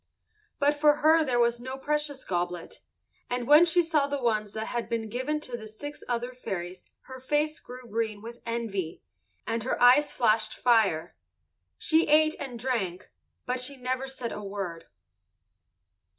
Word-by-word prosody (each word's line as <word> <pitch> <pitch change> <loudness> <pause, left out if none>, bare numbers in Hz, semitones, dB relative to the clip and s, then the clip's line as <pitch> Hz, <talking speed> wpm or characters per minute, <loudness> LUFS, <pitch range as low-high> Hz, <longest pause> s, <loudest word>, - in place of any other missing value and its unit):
But 285 +1 +3
for 295 0 +4
her 320 +1 +6
there 255 -5 0
was 235 0 +2
no 260 +2 -5
precious 295 0 -2
goblet, 175 -1 -3 0.5
and 245 0 -2
when 300 +4 +8
she 350 +1 +3
saw 310 -4 +1
the 285 0 -2
ones 215 -4 0
that 220 0 -3
had 235 0 -4
been 225 -2 -2
given 260 +7 -2
to 250 -4 -6
the 220 -2 -8
six 290 +8 -9
other 245 +1 -2
fairies 180 -7 -6
her 260 0 -10
face 295 +4 0
grew 250 0 -11
green 220 -1 -2
with 235 +3 -10
envy, 210 -8 -3 0.4
and 230 0 -1
her 255 - -2
eyes 260 +4 +6
flashed 215 -2 +2
fire. 215 -10 +2 0.6
She 320 +1 +3
ate 310 +1 +4
and 260 -4 -5
drank, 215 -8 -3 0.3
but 250 +1 -1
she 255 +3 -1
said 255 - -18
never 255 -1 -3
a 210 - -7
word. 195 -4 -5
245 Hz, 165 wpm, -28 LUFS, 220-285 Hz, 0.6 s, when